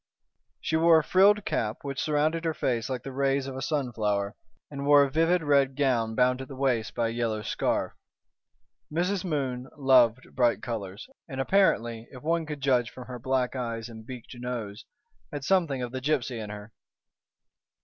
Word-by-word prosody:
She 160 - 0
wore 165 0 +6
a 160 - +2
frilled 200 +5 +4
cap, 110 -1 -1
which 140 -2 -3
surrounded 155 +2 +1
her 165 -1 -1
face 120 -3 -1
like 130 -2 -3
the 135 - -6
rays 135 0 0
of 135 -1 -6
a 130 - -5
sunflower, 110 -8 -1 0.4
and 140 -1 -5
wore 145 -1 +7
a 140 - -1
vivid 165 +3 +2
red 140 -2 +3
gown 120 -6 +1
bound 125 +1 +2
at 130 - -7
the 135 - -9
waist 130 -5 0
by 115 -1 +1
a - - -3
yellow 115 -2 -2
scarf. - - -1 1.0
Mrs. 180 +4 0
Moon 135 -7 -2
loved 130 -3 +4
bright 120 -5 +2
colors, 100 -4 -5 0.2
and 135 -2 -5
apparently, 120 - +2
if 130 0 -12
one 165 0 0
could 150 -2 -6
judge 125 -3 +2
from 125 - -10
her 125 0 -7
black 130 +1 0
eyes 115 -2 -4
and 110 -1 -10
beaked 125 +1 -9
nose, 120 -4 -5 0.5
had 145 -1 -5
something 165 -9 +1
of 120 - -4
the 130 0 -5
gipsy 130 -4 -1
in 105 -1 -6
her. 105 +1 -9
130 Hz, 180 wpm, -27 LUFS, 115-145 Hz, 1.0 s, wore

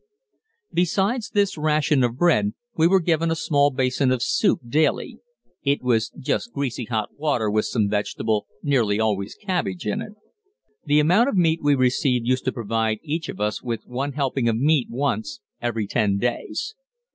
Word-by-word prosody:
Besides 200 +6 +1
this 200 -6 0
ration 150 -2 +2
of 120 0 -1
bread, 110 -12 +2 0.2
we 160 +1 +4
were 190 +2 +4
given 165 -1 +1
a 165 - +1
small 145 -2 +2
basin 130 0 +1
of 130 -2 0
soup 190 +3 +2
daily 155 +5 0 0.4
it 140 -1 0
was 115 -3 +1
just 150 - -2
greasy 130 -3 -3
hot 110 -2 -3
water 125 -9 0
with 110 +1 +1
some 110 -4 0
vegetable, 105 +1 -1 0.2
nearly 115 -8 +2
always 105 -2 -1
cabbage, 175 - -3
in 105 - -1
it. 210 - -8 0.7
The 145 0 +4
amount 180 - +4
of 205 - -1
meat 165 -2 +3
we 145 -1 +3
received 125 -1 +1
used 130 +1 0
to 130 - +1
provide 115 -1 -1
each 160 +1 -3
of - - -7
us 105 0 -1
with 115 -3 -4
one 135 +3 -3
helping 135 -3 0
of 110 - 0
meat 145 0 +2
once 120 -4 -2 0.2
every 115 -3 -1
ten 100 -2 +1
days. 120 - -2
130 Hz, 170 wpm, -23 LUFS, 115-160 Hz, 0.7 s, we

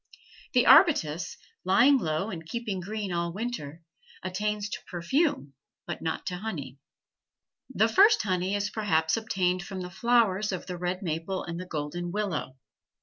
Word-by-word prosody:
The 250 -1 +4
arbutus, 180 - +5 0.3
lying 240 +10 +5
low 165 +4 -1
and 165 -3 -6
keeping 210 +2 -4
green 205 +1 -4
all 170 0 -1
winter, 175 -7 -5 0.4
attains 210 +3 -2
to - - -6
perfume, 175 - 0 0.3
but - - -5
not 160 -1 -3
to 180 -2 -3
honey. 150 -10 -6 0.9
The 220 -4 +2
first 410 - +5
honey 185 0 0
is 205 0 -1
perhaps 160 -7 +1
obtained 185 -5 0
from 190 +1 -6
the 180 0 -6
flowers 215 -1 +2
of 185 - -4
the 180 -2 -6
red 180 +2 -2
maple 170 +3 -3
and 170 0 -5
the 185 - -7
golden 170 +3 -4
willow. 180 -10 -3
185 Hz, 150 wpm, -28 LUFS, 170-215 Hz, 0.9 s, arbutus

